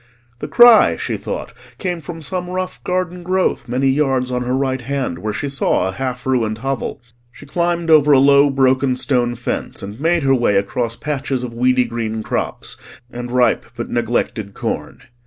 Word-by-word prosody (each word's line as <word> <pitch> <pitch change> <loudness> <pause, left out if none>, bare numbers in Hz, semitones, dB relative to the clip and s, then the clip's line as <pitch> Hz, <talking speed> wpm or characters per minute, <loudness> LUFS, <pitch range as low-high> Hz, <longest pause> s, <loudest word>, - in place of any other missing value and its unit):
The - - -5
cry, 240 -2 +7
she - - -3
thought, - - -5 0.2
came 180 -3 -3
from 165 +2 -8
some 180 +4 -4
rough 185 0 -4
garden 180 -1 -2
growth 185 +2 0
many 130 +3 0
yards 135 -2 +1
on 125 0 -1
her 125 +1 -1
right 130 -1 -1
hand, 130 -9 -3
where 105 +4 -3
she 105 +7 -3
saw 135 -9 0
a - - -2
half 125 +2 -4
ruined 115 -5 0
hovel. 135 0 -4 0.3
She 145 - -14
climbed 170 +2 0
over 150 -1 +6
a 140 - +7
low 140 +1 +5
broken 130 -1 +2
stone 125 -2 0
fence, 115 -2 -4
and 100 +4 -8
made 165 +1 +1
her 135 0 +3
way 120 -5 +2
across 115 +4 -1
patches 140 -3 -3
of 120 -2 -5
weedy 125 +2 +3
green 110 -2 -3
crops - - -3 0.3
and 120 0 -6
ripe 125 0 +2
but 115 - -5
neglected 115 -3 -2
corn. - - -4
130 Hz, 180 wpm, -19 LUFS, 120-150 Hz, 0.3 s, cry